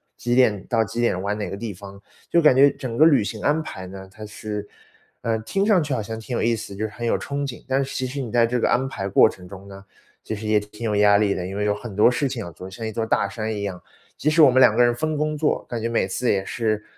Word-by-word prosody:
几 120 Hz, 0 st, -1 dB
点 110 Hz, -7 st, +3 dB
到 115 Hz, -2 st, +2 dB
几 115 Hz, +3 st, -6 dB
点 105 Hz, -6 st, +1 dB
玩 100 Hz, +2 st, -2 dB
哪 105 Hz, -, -3 dB
个 100 Hz, -, -5 dB
地 110 Hz, -2 st, -5 dB
方。 100 Hz, +1 st, -12 dB, 0.3 s
就 170 Hz, -, +4 dB
是 -, -, +1 dB
感 140 Hz, -4 st, +6 dB
觉 140 Hz, +2 st, +7 dB
整 125 Hz, -4 st, -6 dB
个 155 Hz, -, +7 dB
旅 140 Hz, -9 st, +5 dB
行 105 Hz, +1 st, -5 dB
安 155 Hz, +2 st, +1 dB
排 95 Hz, -10 st, -8 dB
呢， 95 Hz, 0 st, -10 dB
它 110 Hz, +1 st, -11 dB
是 105 Hz, -1 st, -6 dB, 0.5 s
呃， 115 Hz, -1 st, -1 dB
听 195 Hz, -, -1 dB
上 200 Hz, -6 st, +4 dB
去 150 Hz, -1 st, -4 dB
好 110 Hz, -, -2 dB
像 110 Hz, +2 st, -6 dB
挺 120 Hz, +2 st, -4 dB
有 -, -, -1 dB
意 115 Hz, 0 st, +2 dB
思， 100 Hz, -2 st, -8 dB
就 110 Hz, +2 st, -2 dB
是 110 Hz, -, -6 dB
很 120 Hz, +1 st, -6 dB
有 -, -, +2 dB
憧 140 Hz, -, -5 dB
憬， 135 Hz, -5 st, -6 dB
但 135 Hz, +1 st, +1 dB
是 135 Hz, -, -7 dB
其 130 Hz, -, -1 dB
实 135 Hz, +2 st, -4 dB
你 120 Hz, -, -6 dB
在 120 Hz, -1 st, +4 dB
这 125 Hz, +1 st, -1 dB
个 -, -, +1 dB
安 130 Hz, +2 st, +1 dB
排 100 Hz, -7 st, -4 dB
过 -, -, +6 dB
程 90 Hz, -1 st, -9 dB
中 100 Hz, +1 st, -11 dB
呢， 100 Hz, 0 st, -11 dB, 0.4 s
其 110 Hz, -, -4 dB
实 105 Hz, +1 st, -8 dB
也 105 Hz, -1 st, +3 dB
挺 105 Hz, +2 st, -9 dB
有 105 Hz, -2 st, 0 dB
压 105 Hz, 0 st, +5 dB
力 100 Hz, -1 st, +2 dB
的， 90 Hz, 0 st, -4 dB
因 100 Hz, +1 st, -6 dB
为 105 Hz, -, -1 dB
有 105 Hz, -, +2 dB
很 105 Hz, -1 st, -8 dB
多 110 Hz, +4 st, +5 dB
事 135 Hz, +2 st, 0 dB
情 125 Hz, -3 st, -5 dB
要 85 Hz, -, -8 dB
做， 95 Hz, +3 st, -10 dB
像 110 Hz, +4 st, -7 dB
一 110 Hz, -, -3 dB
座 110 Hz, +2 st, -2 dB
大 110 Hz, -, +1 dB
山 110 Hz, +2 st, -4 dB
一 100 Hz, -1 st, -4 dB
样。 95 Hz, -3 st, -5 dB, 0.4 s
即 150 Hz, -, +1 dB
使 160 Hz, +1 st, +4 dB
我 135 Hz, -, +7 dB
们 130 Hz, -, +3 dB
2 115 Hz, -4 st, +7 dB
个 120 Hz, -, +5 dB
人 120 Hz, 0 st, +3 dB
分 155 Hz, +4 st, -2 dB
工 155 Hz, 0 st, -1 dB
做， 150 Hz, 0 st, 0 dB
感 120 Hz, -2 st, -4 dB
觉 115 Hz, -, -1 dB
每 115 Hz, -4 st, +1 dB
次 120 Hz, +6 st, 0 dB
也 95 Hz, -1 st, 0 dB
是， 110 Hz, -2 st, -1 dB
110 Hz, 325 characters per minute, -23 LUFS, 100-130 Hz, 0.5 s, 觉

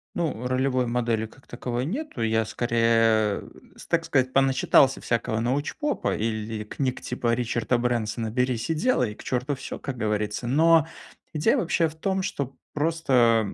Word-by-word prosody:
Ну, 145 Hz, -8 st, -2 dB
ролевой 130 Hz, -1 st, +1 dB
модели, 115 Hz, -2 st, 0 dB
как 130 Hz, +4 st, -21 dB
таковой, 120 Hz, +1 st, -3 dB
нету, 245 Hz, -, -4 dB
я, 110 Hz, 0 st, +2 dB
скорее, 115 Hz, -2 st, +2 dB
э, -, -, -13 dB, 0.3 s
с -, -, -12 dB
так -, -, +1 dB
сказать, 130 Hz, 0 st, +1 dB
поначитался 135 Hz, 0 st, +4 dB
всякого 115 Hz, -1 st, -1 dB
научпопа 145 Hz, -, -1 dB
или 110 Hz, 0 st, -3 dB
книг 130 Hz, +4 st, -3 dB
типа 120 Hz, -1 st, -1 dB
Ричарда 120 Hz, +1 st, 0 dB
Брэнсона 115 Hz, -2 st, -1 dB
"Берись 125 Hz, +1 st, -1 dB
и -, -, +2 dB
делай!". 155 Hz, -, +1 dB
"К -, -, -13 dB
черту 130 Hz, +3 st, -1 dB
всё"- -, -, -7 dB
как 135 Hz, -3 st, -5 dB
говорится. 105 Hz, +1 st, -2 dB
Но 160 Hz, +3 st, +4 dB, 0.5 s
идея 155 Hz, -1 st, +2 dB
вообще 165 Hz, -1 st, +1 dB
в 155 Hz, -, -10 dB
том, 190 Hz, +3 st, -1 dB
что 140 Hz, -9 st, -4 dB, 0.2 s
просто 130 Hz, -9 st, +2 dB
125 Hz, 155 wpm, -25 LUFS, 115-140 Hz, 0.5 s, поначитался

